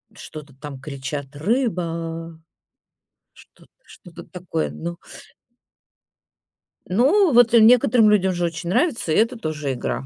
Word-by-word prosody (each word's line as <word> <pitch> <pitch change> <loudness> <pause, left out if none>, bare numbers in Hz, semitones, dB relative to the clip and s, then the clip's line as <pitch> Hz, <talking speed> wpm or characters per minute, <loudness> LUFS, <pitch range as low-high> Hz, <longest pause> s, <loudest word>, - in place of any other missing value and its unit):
что-то 150 -6 -11
там 140 0 -9
кричат: 140 0 -7
"Рыба!" 165 - -3 0.9
Что - - -21
т - - -35
что-то 170 -1 -14
такое, 180 -3 -4
ну. 170 +1 -7 1.9
Ну, 295 - +3
вот 240 -1 +5
некоторым 230 -1 +5
людям 190 -3 +2
же 175 0 -1
очень 170 +1 -5
нравится, 240 - 0
и - - +2
это 230 +3 +1
тоже 150 -8 -4
игра. 130 +1 -4
170 Hz, 120 wpm, -21 LUFS, 155-225 Hz, 1.9 s, вот